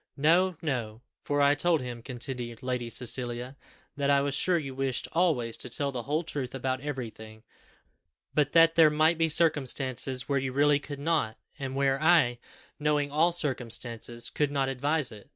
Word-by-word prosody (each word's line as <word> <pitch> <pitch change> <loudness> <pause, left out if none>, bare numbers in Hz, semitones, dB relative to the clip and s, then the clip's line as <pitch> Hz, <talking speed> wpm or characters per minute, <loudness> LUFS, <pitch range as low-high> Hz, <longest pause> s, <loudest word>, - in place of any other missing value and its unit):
"No, 170 +4 +3
no; 120 -6 -3 0.2
for 145 0 +1
I 140 0 +5
told 165 +3 +2
him," 125 -2 -6
continued 120 -1 -6
Lady 125 -2 -2
Cecilia, 125 +1 -2 0.4
"that 140 -1 -1
I 140 -1 +4
was 140 0 -1
sure 175 +5 +3
you 140 -5 -5
wished 135 -2 -2
always 155 -10 +1
to 125 - -1
tell 140 +4 -1
the 125 -2 -4
whole 150 +7 -1
truth 135 -5 -4
about 130 0 -2
everything, 110 -6 -7 0.9
but 145 -1 +1
that 165 0 +6
there 165 -2 +6
might 155 +2 +2
be 165 0 +2
circumstances 135 -5 +1
where 140 -1 +1
you 130 -1 -3
really 145 +1 +3
could 145 0 -8
not; 145 -7 -1 0.2
and 135 -1 -4
where 135 0 +1
I, 155 -8 +4 0.4
knowing 150 -1 0
all 160 +4 +3
the - - -2
circumstances, 120 -4 -3
could 150 -1 0
not 135 -2 0
advise 140 +1 0
it. 105 -2 -13
140 Hz, 175 wpm, -28 LUFS, 125-150 Hz, 0.9 s, that